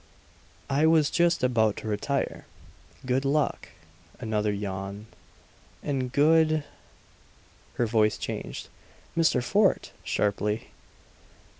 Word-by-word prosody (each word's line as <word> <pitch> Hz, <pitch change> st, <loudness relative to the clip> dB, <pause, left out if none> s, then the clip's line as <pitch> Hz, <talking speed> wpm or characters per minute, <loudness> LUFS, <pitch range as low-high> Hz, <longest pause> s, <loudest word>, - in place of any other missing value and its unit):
"I 145 Hz, +3 st, +3 dB
was 160 Hz, -2 st, +4 dB
just 170 Hz, -3 st, +2 dB
about 110 Hz, -4 st, +2 dB
to -, -, -6 dB
retire. 110 Hz, +7 st, -2 dB, 0.6 s
Good 130 Hz, +1 st, +1 dB
luck" 140 Hz, +1 st, 0 dB, 0.5 s
another 110 Hz, -3 st, 0 dB
yawn 100 Hz, 0 st, -5 dB, 0.8 s
"and 130 Hz, -3 st, -2 dB
good 155 Hz, +2 st, +4 dB, 0.6 s
" -, -, -30 dB
Her 120 Hz, -, +1 dB
voice 110 Hz, -1 st, +2 dB
changed. -, -, -5 dB, 0.5 s
"Mr. 160 Hz, -7 st, +3 dB
Fort!" 200 Hz, +6 st, +2 dB
sharply. 105 Hz, +1 st, -1 dB
125 Hz, 100 wpm, -27 LUFS, 105-155 Hz, 0.8 s, was